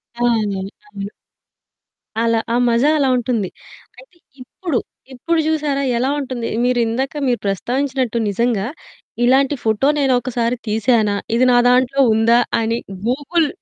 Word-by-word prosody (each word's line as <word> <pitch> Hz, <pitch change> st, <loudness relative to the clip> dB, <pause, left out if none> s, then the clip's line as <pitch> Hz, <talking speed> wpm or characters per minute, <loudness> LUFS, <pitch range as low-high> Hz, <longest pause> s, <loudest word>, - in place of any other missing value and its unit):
ఆ! 240 Hz, -, 0 dB, 0.6 s
అవును. 200 Hz, -6 st, -6 dB, 1.2 s
అలా, 230 Hz, -1 st, +2 dB, 0.2 s
ఆ -, -, +2 dB
మజా 235 Hz, +5 st, +3 dB
అలా 280 Hz, -3 st, +2 dB
ఉంటుంది. 230 Hz, -5 st, -1 dB, 0.5 s
అయితే 375 Hz, -9 st, -19 dB, 0.2 s
ఇప్పుడు, 275 Hz, +2 st, -4 dB, 0.4 s
ఇప్పుడు 330 Hz, +6 st, -1 dB
చూసారా 300 Hz, -3 st, 0 dB, 0.2 s
ఎలా 255 Hz, +3 st, 0 dB
ఉంటుంది? 255 Hz, -4 st, -4 dB, 0.2 s
మీరిందాక 250 Hz, +2 st, 0 dB
మీరు 245 Hz, -1 st, +1 dB
ప్రస్తావించినట్టు 255 Hz, +4 st, -1 dB
నిజంగా 225 Hz, 0 st, 0 dB, 0.6 s
ఇలాంటి 270 Hz, +3 st, +3 dB
ఫోటో 220 Hz, +5 st, +1 dB
నేనొకసారి 250 Hz, -3 st, +1 dB
తీశానా? 215 Hz, -1 st, +2 dB, 0.2 s
ఇది 255 Hz, +2 st, +3 dB
నా 245 Hz, -, +5 dB
దాంట్లో 255 Hz, +2 st, +3 dB
ఉందా? 230 Hz, +2 st, +4 dB, 0.2 s
అని 230 Hz, +1 st, 0 dB, 0.3 s
గూగుల్ 295 Hz, +5 st, +1 dB
245 Hz, 120 wpm, -19 LUFS, 230-275 Hz, 1.2 s, నా